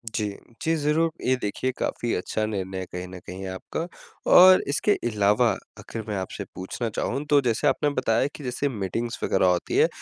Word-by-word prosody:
जी। 110 Hz, -, 0 dB, 0.4 s
जी, 165 Hz, +1 st, +1 dB
ज़रूर। 155 Hz, +2 st, +2 dB, 0.2 s
ये 130 Hz, -, +4 dB
देखिए 105 Hz, +5 st, -1 dB
काफ़ी 120 Hz, -, -1 dB
अच्छा 110 Hz, +4 st, -1 dB
निर्णय 95 Hz, -3 st, -3 dB
है 95 Hz, -, -4 dB
कहीं 90 Hz, 0 st, -5 dB
न 90 Hz, 0 st, -9 dB
कहीं 95 Hz, +1 st, -6 dB
आपका 95 Hz, -, -4 dB, 0.5 s
और 185 Hz, +1 st, +9 dB
इसके 155 Hz, +8 st, +1 dB, 0.2 s
अलावा 105 Hz, +3 st, +3 dB, 0.3 s
आखिर 115 Hz, -, -6 dB
मैं 105 Hz, -, -2 dB
आपसे 95 Hz, -, -4 dB
पूछना 105 Hz, +5 st, -4 dB
चाहूँ 140 Hz, -, -1 dB
तो 145 Hz, -, +6 dB
जैसे 120 Hz, +3 st, +1 dB
आपने 145 Hz, +2 st, +2 dB
बताया 130 Hz, -2 st, +1 dB
कि 145 Hz, -, -9 dB
जैसे 130 Hz, +3 st, -1 dB
मीटिंग्स 115 Hz, +1 st, -3 dB
वग़ैरह 95 Hz, -, +2 dB
होती 90 Hz, -1 st, +1 dB
है। -, -, +6 dB
115 Hz, 185 wpm, -25 LUFS, 95-140 Hz, 0.5 s, और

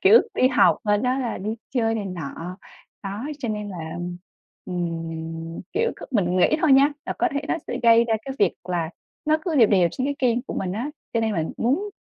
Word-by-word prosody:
Kiểu, 215 Hz, +5 st, +8 dB
đi 255 Hz, -, +4 dB
học, 260 Hz, -, +5 dB
sau 205 Hz, 0 st, +3 dB
đó 255 Hz, +3 st, +1 dB
là 245 Hz, -3 st, -2 dB
đi 215 Hz, +4 st, -3 dB, 0.2 s
chơi 225 Hz, -2 st, +2 dB
này 205 Hz, -, -3 dB
nọ, 175 Hz, +1 st, -6 dB, 0.4 s
đó, 200 Hz, +5 st, -4 dB
cho 245 Hz, -4 st, -3 dB
nên 210 Hz, -1 st, -3 dB
là, 170 Hz, -3 st, -6 dB, 0.7 s
ừm, 165 Hz, -2 st, -4 dB
kiểu, 465 Hz, +4 st, +1 dB
cứ -, -, -9 dB
mình 185 Hz, -6 st, +1 dB
nghĩ 185 Hz, +11 st, +4 dB
thôi 315 Hz, -4 st, +5 dB
nha, 275 Hz, +2 st, +6 dB
là -, -, -1 dB
có -, -, +3 dB
thể 285 Hz, -, 0 dB
nó -, -, +2 dB
sẽ 245 Hz, -, -2 dB
gây 230 Hz, 0 st, +7 dB
ra 225 Hz, -, +1 dB
cái 270 Hz, -, -4 dB
việc 200 Hz, -4 st, +3 dB
là 175 Hz, -3 st, -2 dB, 0.3 s
nó 310 Hz, +1 st, +3 dB
cứ 335 Hz, -4 st, -2 dB
đều 225 Hz, -5 st, +7 dB
đều 185 Hz, -4 st, +4 dB
trên 260 Hz, -, -2 dB
cái 285 Hz, -, -1 dB
kênh 245 Hz, -2 st, +2 dB
của -, -, -6 dB
mình 185 Hz, -2 st, -2 dB
á, 240 Hz, +9 st, -3 dB, 0.2 s
cho 230 Hz, -, +3 dB
nên 220 Hz, -1 st, +1 dB
là 165 Hz, -4 st, 0 dB
muốn 305 Hz, -, 0 dB
215 Hz, 225 wpm, -24 LUFS, 180-255 Hz, 0.7 s, Kiểu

